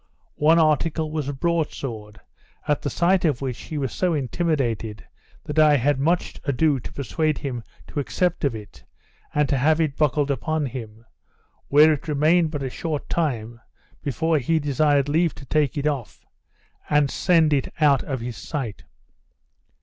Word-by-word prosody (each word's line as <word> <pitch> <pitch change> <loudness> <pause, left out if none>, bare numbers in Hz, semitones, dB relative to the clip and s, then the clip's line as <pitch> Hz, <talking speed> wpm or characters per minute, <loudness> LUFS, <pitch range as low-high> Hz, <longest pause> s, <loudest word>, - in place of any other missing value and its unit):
One 160 +3 +5
article 155 0 +1
was 150 -3 -2
a - - -3
broad 165 +3 0
sword; 105 -5 -7 0.5
at 150 - +1
the 145 - -2
sight 175 +6 +2
of 150 -7 +1
which 130 -3 -4
he 155 - -6
was 135 -3 -2
so 180 -3 0
intimidated, 130 -7 -2 0.4
that 150 +1 -2
I 150 -2 +6
had 140 +2 +1
much 170 +5 0
ado 140 +1 +1
to - - -9
persuade 150 +3 -1
him 125 -4 -4 0.2
to - - -5
accept 175 +5 -1
of 135 -5 +1
it, 105 -2 -11 0.5
and 150 -1 +1
to 140 - +1
have 155 +4 +3
it 155 -4 0
buckled 150 -1 +1
upon 155 +3 -1
him; 115 -3 -8 0.6
where 150 +2 +6
it 150 - -6
remained 155 +3 +3
but 145 -3 -4
a 130 - -2
short 155 -1 -4
time, 120 -8 -2 0.4
before 155 +4 0
he 160 +6 +1
desired 145 -1 +2
leave 160 +3 +1
to 135 - -12
take 150 0 0
it 145 - -2
off, 140 -6 -3 0.6
and 145 -2 +3
send 165 -4 +3
it 135 -2 0
out 145 -4 +4
of 130 -4 -4
his 120 0 -5
sight. 130 -9 -5
145 Hz, 170 wpm, -23 LUFS, 130-155 Hz, 0.6 s, I